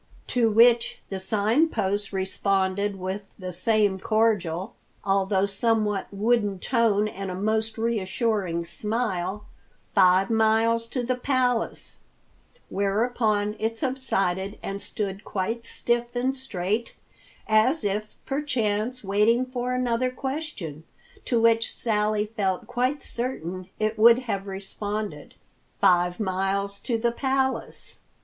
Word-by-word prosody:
To 235 -2 +3
which 235 +2 +5
the 195 - -4
Sign 215 +11 +2
Post 205 -5 -1
responded 195 +1 0
with 190 +2 -5
the 185 -2 -6
same 205 0 +2
cordial, 195 -5 +1 0.3
although 195 0 +2
somewhat 210 0 0
wooden 205 -1 +1
tone 215 -1 +2
and 195 -2 -5
a 180 - -4
most 220 +3 -1
reassuring 210 -5 -1
smile, 205 +1 -2 0.5
"Five 190 +1 +5
miles 225 +1 +3
to 250 +1 -3
the 250 +2 0
Palace," 250 -2 -1 0.7
whereupon 210 +1 0
it 225 +1 -1
subsided 200 -7 -1
and 195 +1 -4
stood 200 -2 -4
quite 225 +4 -3
stiff 240 +1 -1
and 255 +2 +1
straight, 220 -3 -2 0.5
as 220 +7 +3
if, 210 +1 -2
perchance, 250 -4 -1
waiting 210 +5 +3
for 250 -1 -3
another 250 0 +1
question, 255 - -5 0.4
to 235 - +2
which 230 0 +3
Sally 210 -2 +1
felt 200 -4 -2
quite 255 +4 -1
certain 185 -7 -4
it 215 0 -1
would 230 +2 +8
have 200 -4 -3
responded, 200 -3 -5 0.4
"Five 175 +1 +3
miles 200 0 -1
to 235 - -1
the 235 +1 +1
Palace!" 265 +1 -2
215 Hz, 115 wpm, -25 LUFS, 195-235 Hz, 0.7 s, would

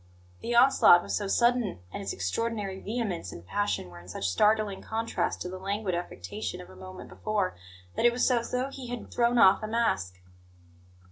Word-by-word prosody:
The 240 - -2
onslaught 240 -8 +7
was - - -2
so 205 - -2
sudden, 235 - +2 0.2
and - - -4
its 100 -1 -3
extraordinary 195 - -2
vehemence 205 - -3
and 85 - -10
passion 205 - -1
were 85 - -11
in 85 - -15
such 95 +2 -3
startling 210 - +2
contrast 225 +1 -2
to - - -4
the 185 +1 -6
languid 200 0 -2
affectation 130 - -5
of 90 - -11
a - - -14
moment 95 0 -10
before, 185 - -2 0.4
that - - -1
it 240 - +7
was 245 +2 +2
as 235 -1 +1
though 255 +2 -1
he 265 -2 -8
had 245 -1 -6
thrown 240 0 +2
off 195 -2 +6
a 215 - -3
mask. 95 - 0
205 Hz, 190 wpm, -28 LUFS, -, 0.4 s, onslaught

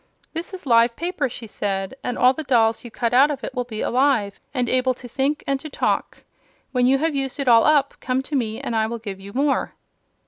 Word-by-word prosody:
'This 330 +2 -5
is 365 - -11
live 230 -2 +4
paper,' 335 -5 -2
she 230 - -8
said, 195 -2 -3
'and 245 - -3
all 255 +1 +5
the 315 - -5
dolls 230 -6 +2
you 240 - -8
cut 230 +1 -2
out 270 +4 +6
of 280 -3 -4
it - - -5
will 250 -1 -1
be 225 -3 -6
alive, 250 -6 +1
and 250 -3 -1
able 255 +1 +1
to 245 - -10
think 275 +5 -1
and 275 -1 0
to 310 - -8
talk. - - -2 0.5
When 250 -2 +2
you 270 +1 +4
have 320 +2 0
used 270 0 -3
it 275 - -2
all 230 -2 +6
up, 290 -2 +3
come 255 +1 -1
to 290 - -5
me 225 -4 -1
and 235 - -3
I 220 0 +2
will 235 +1 -4
give 205 -4 -7
you 195 +1 -10
more.' 275 +4 0
255 Hz, 240 wpm, -22 LUFS, 230-275 Hz, 0.5 s, out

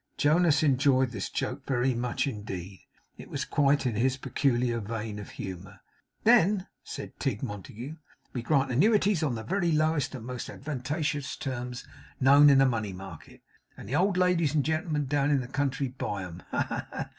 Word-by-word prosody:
Jonas 155 -1 +4
enjoyed 130 -2 +3
this 100 -5 -4
joke - - -3
very 130 -1 +1
much 120 0 -1
indeed. 100 - -6 0.3
It - - -10
was - - -3
quite 140 -1 +2
in 125 - +1
his 130 +5 +1
peculiar 125 -3 0
vein 110 0 -5
of 105 - -8
humour. 95 +1 -8 0.4
'Then,' 210 -4 +4 0.2
said - - -8
Tigg - - -2
Montague, 115 - -6 0.4
'we 125 - -2
grant 135 +1 +1
annuities 200 - +3
on 140 -6 0
the 110 - -5
very 175 - 0
lowest 155 -2 +1
and 120 -3 -8
most 125 -1 -5
advantageous 145 +1 -3
terms 125 -3 -5 0.3
known 140 +2 +7
in 140 - +6
the 135 - +6
money 110 -6 -1
market; 95 -3 -11 0.3
and - - -10
the 130 - -2
old 185 +3 +2
ladies 175 -5 +2
and 145 - +2
gentlemen 155 -1 0
down 140 +1 +1
in 145 -2 +3
the 125 - -6
country 135 0 -1
buy 105 -6 -4
'em. 90 0 -8
Ha, - - +1
ha, - - -4
ha! - - -5
135 Hz, 180 wpm, -28 LUFS, 115-150 Hz, 0.4 s, known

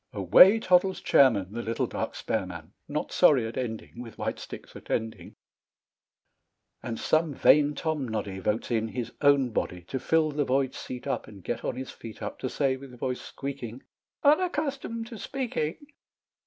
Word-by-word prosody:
Away 105 - +7
toddles 185 -2 +3
Chairman, 105 -9 +4
The 120 +2 -4
little 115 0 -1
dark - - -4
spare - - -2
man, - - -9
Not - - -3
sorry 130 -6 +5
at 115 - -6
ending, 115 -1 -5
With 115 -2 -10
white - - -3
sticks - - -10
attending, 110 -1 -4 1.5
And 115 -2 -5
some 155 -2 +1
vain 145 +2 +5
Tomnoddy 110 - -3
Votes 105 +5 -1
in 110 -1 +1
his 120 +1 -5
own 140 -4 +4
body 90 -4 -2
To 130 +10 -4
fill 160 +2 +2
the 145 0 0
void 135 0 +1
seat 125 -1 -7
up, - - -2
And 100 -4 -13
get 120 - -3
on - - -2
his 130 0 -6
feet 110 -2 -10
up, - - -5
To 130 - -3
say, 135 -1 0
with 130 -2 -12
voice 125 +1 -3
squeaking, 135 -3 -7 0.4
"Unaccustomed 285 -7 +1
to 230 -2 -9
speaking." 230 - -3
130 Hz, 165 wpm, -27 LUFS, 115-155 Hz, 1.5 s, Away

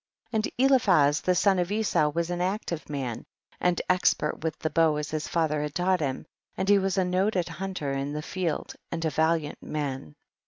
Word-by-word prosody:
32. - - -5 0.2
And 260 +2 +5
Eliphaz 155 - +4
the 180 - +2
son 195 0 +3
of 175 +2 -1
Esau 205 -8 +2
was 170 +3 -2
an 175 0 -2
active 180 -4 -2
man 130 -6 -4 0.4
and 180 -1 +1
expert 180 -4 +1
with 160 -2 -2
the 155 - -3
bow 160 0 +3
as 150 0 -4
his 155 -1 -2
father 155 -3 0
had 150 -1 -4
taught 185 +1 +2
him, 135 -4 -2 0.3
and 190 - -1
he 200 0 +6
was 195 0 -1
a 190 - +3
noted 185 0 +1
hunter 185 -7 -4
in 135 +1 -2
the 150 0 -4
field 175 -2 -3 0.2
and 165 -1 -2
a 160 - +1
valiant 160 0 0
man. 135 - -4
165 Hz, 200 wpm, -27 LUFS, 150-185 Hz, 0.4 s, he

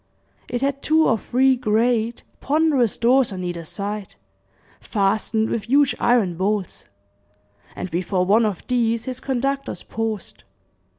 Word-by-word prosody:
It 245 - -3
had 275 0 -1
two 315 +1 +3
or 230 - +3
three 260 +4 +2
great, 230 0 0 0.2
ponderous 285 -6 +2
doors 250 +1 +3
on 185 -1 -5
either 175 -1 -4
side, 205 +4 -5 0.6
fastened 220 +2 0
with 215 -3 -2
huge 280 +1 +4
iron 210 -9 +2
bolts; 195 0 -2 0.9
and 185 - -6
before 180 +1 0
one 215 +5 +4
of 200 -5 -5
these 230 -2 0
his 255 -1 -5
conductors 275 +1 -2
paused. 220 -4 -5
230 Hz, 130 wpm, -22 LUFS, 200-255 Hz, 0.9 s, huge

